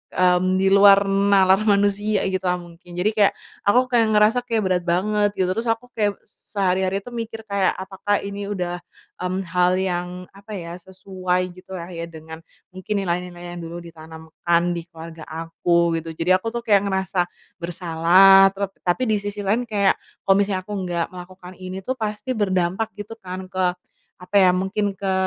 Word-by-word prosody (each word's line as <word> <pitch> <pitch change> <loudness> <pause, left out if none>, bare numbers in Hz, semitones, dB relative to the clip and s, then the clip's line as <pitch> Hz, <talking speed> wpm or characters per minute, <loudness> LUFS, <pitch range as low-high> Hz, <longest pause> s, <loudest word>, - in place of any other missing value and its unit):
mmm, 185 +1 +3
di 195 0 +2
luar 200 0 +7
nalar 195 -1 +4
manusia 205 0 +2
gitulah 185 -1 0
mungkin. 175 0 -13
Jadi 195 +5 +1
kayak 210 -2 +3 0.3
aku 250 +4 +3
kayak 230 -2 +4
ngerasa 215 +4 +4
kayak 225 -3 0
berat 185 -2 0
banget 205 +4 +2
gitu, 185 -1 +1
terus 225 +3 -3
aku 225 +2 -1
kayak 205 -2 0
s - - -36 0.2
sehari-hari 190 0 +1
tuh 245 - -10
mikir 225 -1 -6
kayak, 200 -2 0
apakah 195 +2 -2
ini 200 0 -5
udah, 180 -3 -3 0.4
mmm, 185 +1 -2
hal 180 +1 +2
yang, 180 -1 -2
apa 200 +2 -10
ya, 170 -1 -7
sesuai 185 0 -3
gitu 185 +1 -11
lah 175 0 -7
ya 170 -1 -5
dengan 160 -1 -10 0.3
mungkin 185 +3 -4
nilai-nilai 180 -2 -3
yang 175 - -7
dulu 170 +1 -7
ditanamkan 160 +1 -3
di 170 0 -5
keluarga 165 -1 -11
aku, 165 +1 0
gitu. 160 0 -8
Jadi 170 +3 0
aku 185 +4 +2
tuh 235 - -3
kayak 205 -3 +3
ngerasa 190 -2 0 0.3
bersalah 175 +3 +5
trap 195 -1 -3 0.2
tapi 175 +8 +2
di 215 -4 +1
sisi 205 0 -5
lain 225 +5 0
kayak, 200 -3 +2 0.2
kalau 195 0 +4
misalnya 195 -2 0
aku 210 - -7
nggak 175 -2 -1
melakukan 180 0 -11
ini 185 +1 -7
tuh 255 +3 -3
pasti 215 +4 -3
berdampak 190 -1 0
gitu 215 +2 -9
kan 185 0 -8
ke, 180 -1 0 0.4
apa 180 +2 -9
ya, 185 -1 +5
mungkin 195 +2 -1
ke 195 -1 -2
190 Hz, 175 wpm, -22 LUFS, 175-205 Hz, 0.4 s, luar